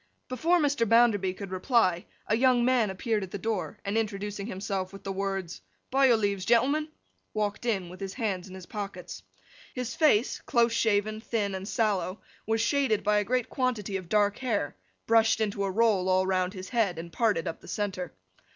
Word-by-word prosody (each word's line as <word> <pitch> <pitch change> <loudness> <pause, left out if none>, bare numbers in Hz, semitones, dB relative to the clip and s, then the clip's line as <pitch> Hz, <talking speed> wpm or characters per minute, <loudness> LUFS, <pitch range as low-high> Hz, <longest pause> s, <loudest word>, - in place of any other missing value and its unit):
Before 325 +8 +2
Mr. 285 -7 +1
Bounderby 225 -5 +4
could 195 -1 -8
reply, 185 -2 +1 0.2
a 215 - +1
young 245 0 +4
man 245 -4 +3
appeared 210 +3 -1
at 190 - -5
the 200 - -5
door, 215 0 -3
and 200 +2 -2
introducing 205 -2 -2
himself 190 -2 -3
with 195 0 -11
the 195 - -3
words, 195 -3 -3 0.3
'By 270 +1 +5
your 240 -3 +5
leaves, 200 -3 -1
gentlemen!' 265 +8 +2 0.5
walked 210 +2 -2
in 195 -6 0
with 180 +2 -11
his 195 -1 -5
hands 195 -6 -2
in 185 - -9
his 185 -2 -9
pockets. 195 -4 -6 0.5
His 250 -1 -3
face, 295 -8 +3
close 235 -1 +3
shaven, 215 -1 +1
thin, 210 -4 -1
and 190 +1 -5
sallow, 205 -4 0 0.3
was 225 0 +1
shaded 245 -3 +1
by 210 0 +3
a - - 0
great 250 +2 0
quantity 235 -7 -2
of 185 -3 -5
dark 205 0 +2
hair, 215 - -1 0.3
brushed 225 0 +4
into 205 -2 -1
a - - -1
roll 200 -2 +2
all 185 0 +3
round 185 0 0
his 185 0 -7
head, 215 -8 +1
and 170 +1 -8
parted 210 -9 +1
up 165 - -5
the - - -14
centre. 195 -4 -3
210 Hz, 190 wpm, -28 LUFS, 190-230 Hz, 0.5 s, By